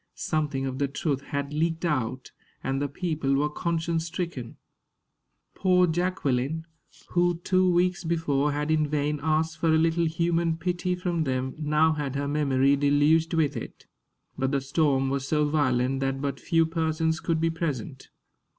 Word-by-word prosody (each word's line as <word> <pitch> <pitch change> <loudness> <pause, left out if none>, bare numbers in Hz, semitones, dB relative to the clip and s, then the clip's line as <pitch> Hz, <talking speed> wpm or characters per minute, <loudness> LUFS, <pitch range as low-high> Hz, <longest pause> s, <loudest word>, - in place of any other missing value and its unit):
Something 145 -4 -1
of 130 0 -4
the 140 - +1
truth 140 0 -2
had 140 0 -3
leaked 165 +2 0
out, 130 -5 -2 0.3
and 135 +1 -1
the 145 - 0
people 150 -2 -1
were 150 +2 +1
conscience 165 0 -1
stricken. 165 -8 -5 1.0
Poor 180 -1 +3
Jacqueline, 160 -4 -1 0.4
who 175 -1 +2
two 185 0 +3
weeks 180 +1 +1
before 150 -4 0
had 150 +2 -1
in 155 -1 +2
vain 150 0 -1
asked 160 +1 0
for 165 - +1
a 160 - +4
little 165 +1 +2
human 170 0 0
pity 180 +1 -1
from 175 -2 -1
them, 130 -2 -2
now 155 +1 +3
had 145 -3 -3
her 140 0 -1
memory 140 -2 +2
deluged 145 +4 +3
with 155 -4 +1
it. - - -8 0.5
But 135 0 0
the 140 0 0
storm 135 -1 +1
was 135 -1 -2
so 150 0 +2
violent 135 -3 +1
that 135 0 -1
but 140 -1 -3
few 165 -1 +2
persons 160 0 0
could 165 -2 -1
be 165 0 +1
present. 145 -5 -4
155 Hz, 160 wpm, -26 LUFS, 140-165 Hz, 1.0 s, a